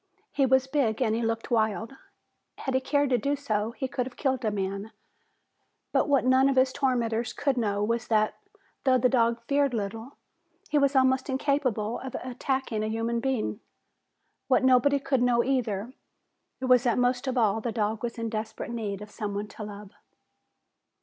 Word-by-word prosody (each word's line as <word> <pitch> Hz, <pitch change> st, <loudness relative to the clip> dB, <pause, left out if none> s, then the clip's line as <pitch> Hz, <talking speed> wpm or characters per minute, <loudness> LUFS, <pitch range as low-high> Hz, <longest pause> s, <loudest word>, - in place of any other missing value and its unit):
He 275 Hz, -2 st, +2 dB
was 265 Hz, 0 st, +4 dB
big 265 Hz, -6 st, 0 dB
and 230 Hz, -4 st, +1 dB
he 230 Hz, -, 0 dB
looked 225 Hz, 0 st, -2 dB
wild. 220 Hz, +2 st, 0 dB, 0.6 s
Had 265 Hz, -, -3 dB
he 260 Hz, -, +2 dB
cared 285 Hz, +1 st, +1 dB
to 245 Hz, -, +3 dB
do 280 Hz, +6 st, 0 dB
so, 220 Hz, -7 st, -1 dB
he 265 Hz, +1 st, -3 dB
could 250 Hz, -1 st, -2 dB
have 255 Hz, -, -12 dB
killed 265 Hz, -3 st, 0 dB
a 220 Hz, -, +2 dB
man. 200 Hz, +1 st, -3 dB, 1.0 s
But -, -, +2 dB
what 275 Hz, -3 st, +3 dB
none 260 Hz, +1 st, +5 dB
of 275 Hz, -, +1 dB
his 260 Hz, 0 st, +3 dB
tormentors 240 Hz, -4 st, 0 dB
could 275 Hz, -2 st, 0 dB
know 205 Hz, -4 st, 0 dB
was 230 Hz, +2 st, -1 dB
that, 215 Hz, -1 st, +2 dB, 0.5 s
though 260 Hz, -2 st, +4 dB
the 250 Hz, 0 st, +3 dB
dog 235 Hz, -2 st, +2 dB
feared 280 Hz, -2 st, +2 dB
little, 225 Hz, +5 st, -4 dB, 0.6 s
he 300 Hz, -, +4 dB
was 280 Hz, 0 st, +2 dB
almost 260 Hz, +1 st, +3 dB
incapable 260 Hz, -5 st, 0 dB
of 265 Hz, -1 st, -7 dB
attacking 255 Hz, -2 st, -2 dB
a -, -, -1 dB
human 225 Hz, +2 st, -1 dB
being. 245 Hz, -4 st, -1 dB, 0.9 s
What 260 Hz, -1 st, +3 dB
nobody 260 Hz, +2 st, +4 dB
could 270 Hz, -2 st, 0 dB
know 240 Hz, -1 st, +3 dB
either 240 Hz, -4 st, -1 dB, 0.7 s
was 255 Hz, -2 st, +4 dB
that, 240 Hz, -3 st, +1 dB
most 250 Hz, +1 st, +1 dB
of 260 Hz, 0 st, -1 dB
all, 220 Hz, -2 st, +2 dB
the 235 Hz, -, -2 dB
dog 215 Hz, -1 st, -1 dB
was 240 Hz, 0 st, -4 dB
in 230 Hz, 0 st, -2 dB
desperate 220 Hz, +1 st, -4 dB
need 210 Hz, -4 st, -4 dB
of 210 Hz, -, -12 dB
someone 205 Hz, 0 st, -4 dB
to 215 Hz, -, -8 dB
love. 205 Hz, -1 st, -9 dB
240 Hz, 180 wpm, -27 LUFS, 220-265 Hz, 1.0 s, none